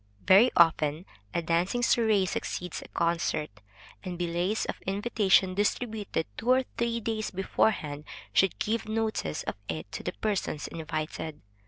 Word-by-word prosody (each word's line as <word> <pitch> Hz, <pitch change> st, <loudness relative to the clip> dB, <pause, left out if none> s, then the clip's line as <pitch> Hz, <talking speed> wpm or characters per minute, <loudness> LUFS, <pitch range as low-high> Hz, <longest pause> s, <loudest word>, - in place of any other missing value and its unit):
Very 200 Hz, +6 st, +7 dB
often 160 Hz, 0 st, +4 dB, 0.3 s
a 170 Hz, -, -1 dB
dancing 170 Hz, +8 st, +1 dB
soirée 220 Hz, -5 st, +3 dB
succeeds 180 Hz, -1 st, -3 dB
a -, -, -11 dB
concert, 170 Hz, -4 st, 0 dB, 0.5 s
and 180 Hz, -3 st, -5 dB
billets 175 Hz, +4 st, 0 dB
of -, -, -5 dB
invitation 195 Hz, -2 st, +3 dB
distributed 205 Hz, -3 st, -1 dB
two 230 Hz, -, -3 dB
or 260 Hz, +1 st, +5 dB, 0.2 s
three 235 Hz, 0 st, +1 dB
days 220 Hz, -1 st, -2 dB
beforehand 155 Hz, -6 st, 0 dB, 0.3 s
should 195 Hz, -, +3 dB
give 220 Hz, +1 st, -1 dB
notice 220 Hz, -, -1 dB
of -, -, -3 dB, 0.2 s
it 80 Hz, +4 st, -4 dB
to -, -, -5 dB
the -, -, -3 dB
persons 195 Hz, -10 st, -2 dB
invited. 155 Hz, -1 st, -5 dB
190 Hz, 140 wpm, -29 LUFS, 165-220 Hz, 0.5 s, Very